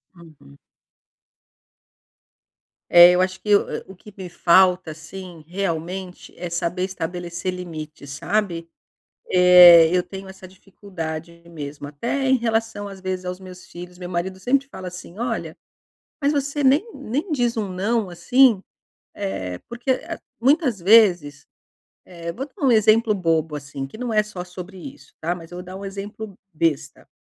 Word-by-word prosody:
Uhum. 155 - -17 2.3
É 175 0 +9
eu 180 +1 +3
acho 185 0 -1
que 210 -1 +4
o - - +4 0.3
o - - -13
que 210 +3 -15
me 185 -2 -7
falta 180 0 +3
assim, 165 +1 -10
realmente 180 0 -4
é 175 0 -5
saber 170 +2 -2
estabelecer 175 -1 -4
limites, 155 -5 -8
sabe? 170 +1 -2 0.6
Eh, 180 -2 +9
eu 180 - +2
tenho 195 +1 -9
essa 190 0 -11
dificuldade 170 -4 -8
mesmo 145 -3 -8
até 235 - -3
em 265 - +5
relação 225 -3 -2
às 195 -1 -11
vezes 185 -1 -4
aos 180 +1 -5
meus 185 -1 -12
filhos, 175 +1 -11
meu 180 -1 -7
marido 185 +2 -3
sempre 275 +5 +1
fala 190 -8 -8
assim: 180 +1 -11
"Olha, 240 - -3 0.7
mas 285 +1 +2
você 285 0 -1
nem 275 +8 +4
nem 280 - -4
diz 240 -5 0
um 210 -3 -2
não, 200 +2 -1
assim", 245 +3 +4 0.5
eh, 95 -2 -4
porque 245 +2 -1 0.4
muitas 265 - +2
vezes, 175 -7 +4 0.6
eh 170 -2 -7
vou 265 +7 -5
dar 295 +2 -5
um 260 - +5
exemplo 220 0 +4
bobo 165 -5 0
assim 140 -1 -6
que 135 - -12
não 245 -1 -3
é 215 0 +3
só 200 -4 -7
sobre 180 +1 -10
isso 280 +9 -12
tá 170 +2 -1
mas 165 -1 -12
eu 175 - -8
vou 180 - -7
dar 185 +1 -10
um 200 - -8
exemplo 200 +1 -7 0.2
besta. 155 -2 -2
185 Hz, 155 wpm, -22 LUFS, 170-215 Hz, 2.3 s, É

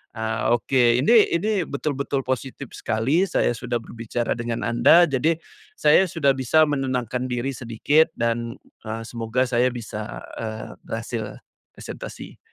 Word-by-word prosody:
Ah, 110 +1 0
oke. 120 0 +3
Ini 220 +1 +5
ini, 210 +6 0 0.2
betul-betul 140 -1 -2
positif 130 +1 -4
sekali, 130 - 0
saya 165 - +1
sudah 120 +1 -4
berbicara 115 +1 -4
dengan 120 -1 -3
Anda, 120 +8 +6
jadi 155 +1 +2 0.4
saya 155 +5 +4
sudah 155 -5 +2
bisa 135 +4 +3
menenangkan 130 -4 -1
diri 125 +2 -2
sedikit, 130 +5 +2
dan, 115 0 -1 0.3
eee, 110 +1 -4
semoga 115 +2 -1
saya 125 0 +2
bisa, 115 -3 -6 0.2
eee, 110 -1 -6
berhasil 115 -1 -5 0.3
presentasi. - - -9
125 Hz, 130 wpm, -23 LUFS, 115-140 Hz, 0.4 s, Anda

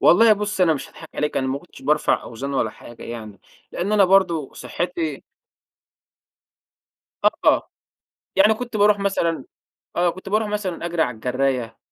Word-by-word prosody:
والله 220 +5 +7
بُصّي 210 -2 0
أنا 165 -3 +4
مش 140 - -6
هاضحك - - -13
عليكِ، 150 - -1
أنا 130 - +1
ما 135 +1 -1
كنتش 175 - -16
بارفع 150 0 +2
أوزان 140 +4 -5
ولا - - +1
حاجة 120 - -13
يعني، 110 -4 -8 0.3
لإن 195 +4 -2
أنا 205 -2 +6
برضو 180 -6 +2
صحّتي 165 -5 -3 2.0
آه، - - +3 0.7
يعني 210 +3 +6
كنت 240 0 -5
بارُوح 205 0 +4
مثلًا 195 -5 0 0.5
آه، 175 0 +3
كنت 185 +3 -7
بارُوح 215 +2 +1
مثلًا 200 -5 -3
أجري 170 -1 -1
على 125 -5 0
الجراية، 125 0 -1
170 Hz, 150 wpm, -22 LUFS, 135-200 Hz, 2.0 s, والله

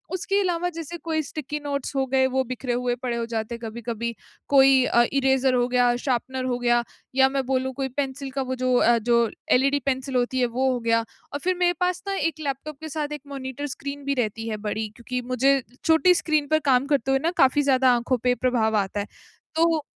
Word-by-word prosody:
उसके 395 +2 0
अलावा, 355 -1 0
जैसे 335 +1 -6
कोई 315 -1 +1
स्टिकी 295 +1 -5
नोट्स 280 -1 -3
हो 270 - +1
गए, 265 0 +3
वो 265 0 0
बिखरे 255 0 -4
हुए 245 0 0
पड़े 240 -2 -1
हो 230 - -2
जाते 225 +1 -2
हैं - - -10
कभी-कभी, 235 +1 -4 0.4
कोई 270 -2 +6
अ, 240 - +4
इरेज़र 265 -1 +2
हो 245 0 +2
गया, 245 -1 +3
शार्पनर 260 0 -1
हो 245 -1 -1
गया 240 0 +2 0.3
या 265 0 +5
मैं 270 -2 0
बोलूँ, 260 0 -1
कोई 270 +1 -2
पेंसिल 270 0 -3
का 270 0 -2
वो 260 - -1
जो 255 0 +2
अ, 235 0 +4
जो 235 0 +5 0.4
एलईडी 275 +2 +2
पेंसिल 265 0 -2
होती 250 +1 +1
है, 250 - +3
वो 255 +3 0
हो 250 - -1
गया 230 0 +1 0.3
और 285 - -2
फिर 370 0 +1
मेरे 355 -1 +3
पास 360 0 0
ना 395 - -1 0.2
एक 315 - -23
लैपटॉप 285 0 -5
के 315 - -6
साथ 300 -1 -2
एक - - -47
मॉनिटर 275 0 -5
स्क्रीन 280 0 -6
भी 280 - +1
रहती 225 0 -4
है 215 - -3
बड़ी, 220 +1 -2
क्योंकि 250 +1 -4
मुझे 270 +2 +3 0.2
छोटी 325 +3 +5
स्क्रीन 305 -3 +1
पर - - +3
काम 255 +2 +3
करते 270 -1 +1
हुए 270 - +3
ना 340 - +2
काफ़ी 265 +2 +4
ज़्यादा 260 -1 +4
आँखों 240 +2 0
पे 245 - +4
प्रभाव 220 -3 +2
आता 195 +2 -5
है। 200 - -2 0.5
तो, 325 -1 +3
265 Hz, 220 wpm, -24 LUFS, 245-285 Hz, 0.5 s, कोई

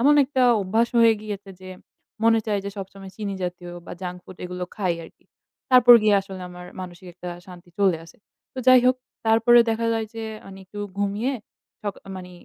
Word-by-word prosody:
এমন 285 +4 +5
একটা 260 -1 0 0.2
অভ্যাস 220 +5 +1
হয়ে 230 -1 +7
গিয়েছে 205 -2 -7
যে 185 - -10 0.6
মনে 225 0 +5
চায় 205 -2 0
যে 200 - -3
সবসময় 195 0 -8
চিনি 205 -2 -4
জাতীয় 175 0 -5 0.2
বা - - -7
junk 180 -1 -5
food 185 - -12
এগুলো 180 0 -4
খাই 185 -5 0
আরকি। - - -18 0.5
তারপর 250 -1 +9
গিয়ে 210 -1 +4
আসলে 195 -1 -9
আমার 180 0 -10
মানসিক 185 0 -9
একটা 180 0 -8 0.2
শান্তি 180 -1 -13
চলে 195 -4 +3
আসে। 165 - -17 0.4
তো - - -9
যাই 255 -1 +8
হোক 255 0 +4 0.3
তারপরে 225 +2 +6
দেখা 230 +1 -1
যায় 225 -1 -1
যে 225 - -5 0.2
মানে 195 0 -11
একটু 200 +2 -11 0.2
ঘুমিয়ে 205 +6 0 0.5
সকা 205 -2 -4 0.2
মানে 180 -1 -9
200 Hz, 190 wpm, -24 LUFS, 185-225 Hz, 0.6 s, তারপর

